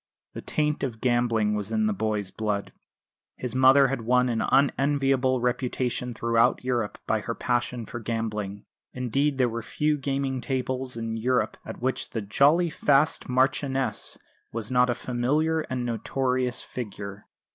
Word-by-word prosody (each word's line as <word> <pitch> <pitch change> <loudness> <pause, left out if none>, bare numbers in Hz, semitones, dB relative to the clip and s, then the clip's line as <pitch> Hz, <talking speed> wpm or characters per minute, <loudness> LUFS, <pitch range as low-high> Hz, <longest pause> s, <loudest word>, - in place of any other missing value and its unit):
The - - -6
taint 150 -1 -1
of 120 -5 -3
gambling 120 -4 +2
was 105 0 -3
in 110 -1 +1
the 105 - +1
boy's 105 -1 -2
blood. 105 -2 -2 0.6
His 125 -3 -4
mother 130 +1 +6
had 135 -2 -2
won 125 +2 +3
an 115 -2 0
unenviable 135 -1 +2
reputation 125 0 -1
throughout 115 +1 +2
Europe 120 -4 -1
by - - +1
her - - -4
passion 120 -1 -1
for 120 - -6
gambling; 105 -3 -3 0.3
indeed 135 +3 0
there 130 -2 +3
were 115 0 -3
few 150 +6 0
gaming 135 -1 -1
tables 130 -1 -2
in 115 0 -3
Europe 125 +2 +1
at - - -9
which 130 0 -1
the 115 - -3
"jolly 150 - +3
fast 145 0 +2
Marchioness" 135 +1 0 0.3
was 115 +1 -4
not 125 0 +4
a 120 - +1
familiar 140 +7 0
and 125 -1 -2
notorious 125 +2 -1
figure. 100 -4 -7
125 Hz, 150 wpm, -26 LUFS, 115-135 Hz, 0.6 s, mother